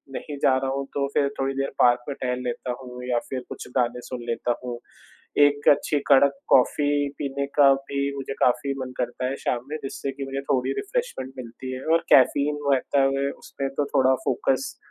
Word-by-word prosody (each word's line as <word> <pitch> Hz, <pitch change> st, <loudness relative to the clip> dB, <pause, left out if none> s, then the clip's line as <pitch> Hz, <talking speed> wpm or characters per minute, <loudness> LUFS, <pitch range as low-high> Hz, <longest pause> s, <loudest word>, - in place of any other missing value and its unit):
नहीं 145 Hz, -2 st, -6 dB
जा 130 Hz, -, +5 dB
रहा 135 Hz, 0 st, -1 dB
हूँ, 140 Hz, 0 st, -2 dB
तो 140 Hz, -1 st, 0 dB
फिर 140 Hz, -, +3 dB
थोड़ी 135 Hz, 0 st, 0 dB
देर 135 Hz, 0 st, -1 dB
पार्क 120 Hz, 0 st, +4 dB
में 140 Hz, -, -3 dB
टहल 125 Hz, -1 st, -1 dB
लेता 125 Hz, +1 st, -3 dB
हूँ 125 Hz, -1 st, -9 dB
या 120 Hz, -1 st, +2 dB
फिर 130 Hz, -, -2 dB
कुछ -, -, -7 dB
गाने 125 Hz, 0 st, 0 dB
सुन 125 Hz, -2 st, -5 dB
लेता 120 Hz, +1 st, 0 dB
हूँ। 120 Hz, -1 st, -4 dB, 0.7 s
एक 145 Hz, 0 st, +2 dB
अच्छी 145 Hz, +1 st, +2 dB
कड़क 140 Hz, 0 st, +5 dB
कॉफ़ी 145 Hz, +2 st, +3 dB
पीने 140 Hz, 0 st, -2 dB
का 140 Hz, -2 st, +7 dB
भी 135 Hz, +1 st, -4 dB, 0.2 s
मुझे 135 Hz, 0 st, -4 dB
काफ़ी 140 Hz, +3 st, +2 dB
मन 130 Hz, -1 st, -5 dB
करता 125 Hz, +1 st, -2 dB
है, 135 Hz, +2 st, -2 dB
शाम 125 Hz, -, -1 dB
में 155 Hz, -, -2 dB
जिससे 135 Hz, 0 st, -4 dB
कि 140 Hz, -, -6 dB
मुझे 135 Hz, 0 st, -4 dB
थोड़ी 130 Hz, -1 st, +1 dB
रिफ्रेशमेंट 440 Hz, -, -3 dB
मिलती 125 Hz, +1 st, -7 dB
है 130 Hz, -, -7 dB
और 165 Hz, -, +2 dB
कैफ़ीन 145 Hz, +3 st, +5 dB
रहता 135 Hz, +1 st, +2 dB
है 140 Hz, 0 st, 0 dB
उसमें 140 Hz, 0 st, -5 dB
तो 145 Hz, -, +2 dB
थोड़ा 130 Hz, 0 st, +5 dB
फ़ोकस 135 Hz, +1 st, 0 dB
135 Hz, 195 wpm, -25 LUFS, 125-140 Hz, 0.7 s, का